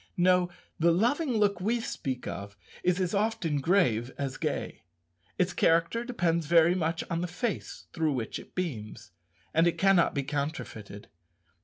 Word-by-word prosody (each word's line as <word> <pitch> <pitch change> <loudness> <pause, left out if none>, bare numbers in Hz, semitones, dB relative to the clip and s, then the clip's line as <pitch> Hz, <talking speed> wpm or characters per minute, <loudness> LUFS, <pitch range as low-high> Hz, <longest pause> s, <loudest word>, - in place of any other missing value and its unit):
No; 180 0 +4 0.3
the 170 +1 +4
loving 245 - +1
look 205 -3 +2
we 230 +5 +1
speak 130 - -4
of 100 +1 -6 0.2
is 180 +1 +1
as 185 0 0
often 200 -8 0
grave 130 - +2
as 135 -2 -3
gay. - - -3 0.6
Its 180 0 +1
character 170 +8 +2
depends 170 - 0
very 170 +1 +5
much 165 -2 -1
on 170 -1 -2
the 180 - -1
face 215 +6 -4
through 160 -3 +1
which 120 -4 -3
it - - -15
beams. 125 - -5 0.4
And 165 +2 +4
it 170 - 0
cannot 195 -3 +4
be 140 - 0
counterfeited. 140 -8 -5
170 Hz, 155 wpm, -29 LUFS, 145-195 Hz, 0.6 s, very